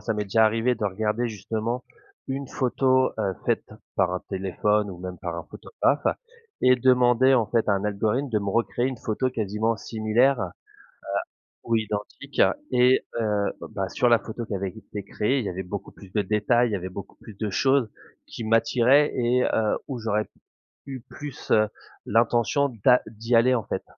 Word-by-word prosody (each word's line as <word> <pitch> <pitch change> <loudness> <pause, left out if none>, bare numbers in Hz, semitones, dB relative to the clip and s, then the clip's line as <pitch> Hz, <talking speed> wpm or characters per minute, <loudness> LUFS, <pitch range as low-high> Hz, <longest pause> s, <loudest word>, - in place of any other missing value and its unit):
ça 110 +1 -2
m'est 105 - -1
déjà 110 +3 +3
arrivé 115 +3 +1
de 105 - -4
regarder 110 +4 -1
justement 110 +3 -3 0.4
une 135 0 -4
photo, 130 0 +2
heu, 100 -3 0
faite - - 0 0.3
par 95 -2 +2
un 90 - -2
téléphone 100 +2 0
ou 90 - -8
même 90 -1 -7
par 85 -1 -4
un 85 - -6
photographe - - -1 0.6
et 130 0 +6
demander, 125 +1 +4
en 115 -3 +3
fait, 115 -2 0
à - - +4
un 100 +1 0
algorithme 110 +6 0
de 110 - +2
me 100 -1 -4
recréer 115 +3 0
une 130 - -5
photo 110 +4 -1
quasiment 110 -1 -1
similaire, 115 +5 +1
heu 95 - 0 1.2
ou 115 - +2
identique 110 +5 -3 0.3
et 125 +1 +4 0.2
heu, 105 -2 0 0.2
bah, 95 -1 -2
sur 125 - +1
la 115 -1 +5
photo 115 +1 -6
qui - - -4
avait 95 0 -2
été 105 0 -8
créée 110 +7 0
il 115 - -4
y - - -1
avait 95 +1 -4
beaucoup 100 +2 -6
plus 95 -2 -15
de 105 - +1
détails, 110 +4 +2
il - - -4
y - - +1
avait 95 -1 -5
beaucoup 95 +1 -9
plus 110 - -13
de 105 0 -3
choses 130 +1 +2 0.4
qui 115 - -7
m'attiraient 125 +5 +4
et 125 +1 +2
heu, 110 -1 +1
où 130 -4 -4
j'aurais 110 -1 -1 0.6
eu 135 -2 -6
plus, 145 -3 -9
heu, 110 -1 +4 0.4
l'intention 120 +5 +2 0.2
d'a 125 -1 +6
d'y 115 +2 -3
aller, 125 +3 +5
en 115 -4 -1
fait. - - -3
110 Hz, 190 wpm, -25 LUFS, 105-125 Hz, 1.2 s, et